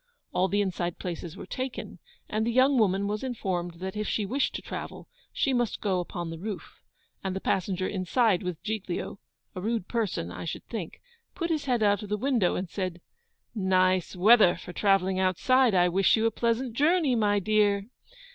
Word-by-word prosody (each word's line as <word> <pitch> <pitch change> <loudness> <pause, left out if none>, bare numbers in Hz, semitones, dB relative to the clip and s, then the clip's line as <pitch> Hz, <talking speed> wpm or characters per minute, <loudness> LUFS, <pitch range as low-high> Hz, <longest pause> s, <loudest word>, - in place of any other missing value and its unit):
All 185 - +2
the 205 +1 +1
inside 175 -3 -2
places 175 -1 -6
were - - -7
taken, 260 0 -5 0.3
and 215 +1 -1
the 235 - 0
young 260 +2 +4
woman 200 -2 +2
was 210 +3 -3
informed 185 -9 -3
that 190 +3 -6
if 210 -1 -2
she 210 - 0
wished 265 +7 0
to - - -4
travel, - - -7 0.2
she 270 - 0
must 240 -3 0
go 190 -3 0
upon 175 -1 -4
the 165 - -7
roof; 205 0 -7 0.4
and 190 -1 -2
the - - -1
passenger 185 -1 -1
inside 195 +1 +1
with 180 -4 -5
Giglio 205 -3 -4 0.3
(a 185 - -6
rude 220 -2 -1
person, 205 - -2
I - - -7
should 165 - -5
think), 210 -9 -6 0.3
put 335 -2 -2
his 305 -3 -1
head 245 -4 +1
out 205 -1 +3
of 210 - -8
the 210 - 0
window, 235 -6 +1
and 185 - -3
said, 185 -1 -4 0.5
'Nice 185 -3 +2
weather 205 0 +6
for 180 - -9
travelling 190 -2 +2
outside! 225 +6 +3
I 180 -1 +5
wish 185 +2 +4
you 220 - +1
a 225 - +3
pleasant 235 +1 -1
journey, 300 +2 +3
my 205 -2 +2
dear. 205 0 +2
200 Hz, 190 wpm, -28 LUFS, 185-230 Hz, 0.5 s, weather